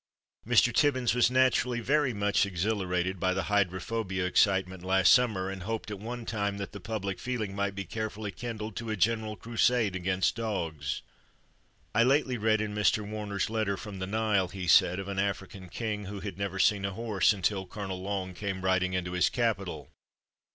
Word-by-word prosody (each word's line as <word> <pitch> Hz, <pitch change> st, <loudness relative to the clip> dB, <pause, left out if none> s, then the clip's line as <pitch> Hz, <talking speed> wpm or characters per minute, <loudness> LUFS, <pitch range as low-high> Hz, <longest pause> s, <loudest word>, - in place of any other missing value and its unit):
Mr. 120 Hz, 0 st, +4 dB
Tibbins 130 Hz, -4 st, +3 dB
was 125 Hz, 0 st, +4 dB
naturally 130 Hz, -1 st, +2 dB
very 140 Hz, +3 st, +2 dB
much 105 Hz, -2 st, +2 dB
exhilarated 95 Hz, -1 st, -1 dB
by 95 Hz, +1 st, +1 dB
the 95 Hz, -, 0 dB
hydrophobia 95 Hz, 0 st, 0 dB
excitement 95 Hz, 0 st, +2 dB
last 95 Hz, 0 st, +5 dB
summer, 110 Hz, -7 st, +2 dB
and 95 Hz, -1 st, -5 dB
hoped 110 Hz, +2 st, -4 dB
at 100 Hz, -, -5 dB
one 120 Hz, +2 st, -6 dB
time 100 Hz, -3 st, -2 dB
that 100 Hz, -1 st, -5 dB
the 100 Hz, -, -8 dB
public 100 Hz, -2 st, -4 dB
feeling 110 Hz, -6 st, -3 dB
might 100 Hz, -1 st, -1 dB
be 100 Hz, 0 st, -4 dB
carefully 110 Hz, -1 st, -4 dB
kindled 110 Hz, -2 st, -6 dB
to 115 Hz, -1 st, -5 dB
a 110 Hz, -, 0 dB
general 110 Hz, +1 st, 0 dB
crusade 115 Hz, -1 st, +1 dB
against 95 Hz, +1 st, 0 dB
dogs. 95 Hz, -9 st, -3 dB, 0.9 s
"I 110 Hz, -, +4 dB
lately 130 Hz, +1 st, +3 dB
read 110 Hz, 0 st, +2 dB
in 105 Hz, -1 st, -3 dB
Mr. 105 Hz, 0 st, +1 dB
Warner's 105 Hz, -2 st, -2 dB
letter 110 Hz, -3 st, -1 dB
from 100 Hz, -2 st, -8 dB
the 95 Hz, -, -3 dB
Nile," 105 Hz, -2 st, +1 dB
he 95 Hz, 0 st, -6 dB
said, 90 Hz, +1 st, +5 dB
"of 95 Hz, 0 st, -5 dB
an 100 Hz, -1 st, -3 dB
African 95 Hz, -1 st, -3 dB
king 105 Hz, 0 st, -3 dB
who 100 Hz, +1 st, -6 dB
had 100 Hz, -2 st, -5 dB
never 100 Hz, -1 st, -3 dB
seen 100 Hz, +1 st, +3 dB
a 100 Hz, 0 st, -2 dB
horse 105 Hz, -3 st, +2 dB
until 95 Hz, -1 st, -1 dB
Colonel 95 Hz, -2 st, -5 dB
Long 95 Hz, -1 st, -3 dB
came 95 Hz, 0 st, -4 dB
riding 95 Hz, 0 st, +2 dB
into 90 Hz, -1 st, -2 dB
his 90 Hz, 0 st, +2 dB
capital. 100 Hz, -, -2 dB
100 Hz, 180 wpm, -29 LUFS, 95-110 Hz, 0.9 s, last